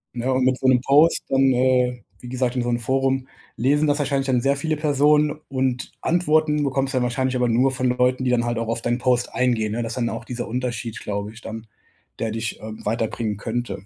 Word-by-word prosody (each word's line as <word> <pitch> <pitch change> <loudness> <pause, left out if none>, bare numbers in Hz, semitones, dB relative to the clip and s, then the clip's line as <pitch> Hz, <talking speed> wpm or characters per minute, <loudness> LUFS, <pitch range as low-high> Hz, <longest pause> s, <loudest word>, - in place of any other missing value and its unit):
Ne, 125 +2 -1
und 130 0 +1
mit 130 0 +2
so 130 - 0
'nem 125 - +5
Post 145 +6 +4
dann, 135 0 +3
äh, 125 -1 +2 0.2
wie 125 - -9
gesagt, 125 0 -1
in 125 - 0
so 120 - -2
'nem 120 - 0
Forum, 135 +2 0 0.3
lesen 145 +5 +2
das 145 0 +1
wahrscheinlich 140 -1 0
dann 130 -2 +2
sehr 140 +2 +2
viele 155 +2 -2
Personen 150 0 +3
und 130 -2 -1
Antworten 155 -3 +2
bekommst 135 0 -1
du - - -2
dann 125 - +2
wahrscheinlich 130 +1 -1
aber 125 -1 +1
nur 130 +4 +3
von 130 -1 0
Leuten, 125 +1 +1
die 125 - +1
dann 120 -1 +2
halt 120 -1 -1
auch 115 0 -2
auf 115 0 -1
deinen 120 0 0
Post 125 -1 0
eingehen, 115 -4 +1
ne, 120 +1 -2
das 115 - -4
ist - - -6
dann 120 -1 0
auch 115 +1 -5
dieser 120 0 -5
Unterschied, 120 -2 -4
glaube 100 +1 -4
ich, 115 - -13
dann, 110 0 -8 0.5
der 110 -1 -1
dich, 110 0 -4
ähm, 110 0 -9
weiterbringen 110 -1 -1
könnte. 115 -1 -4
125 Hz, 235 wpm, -22 LUFS, 120-135 Hz, 0.5 s, nem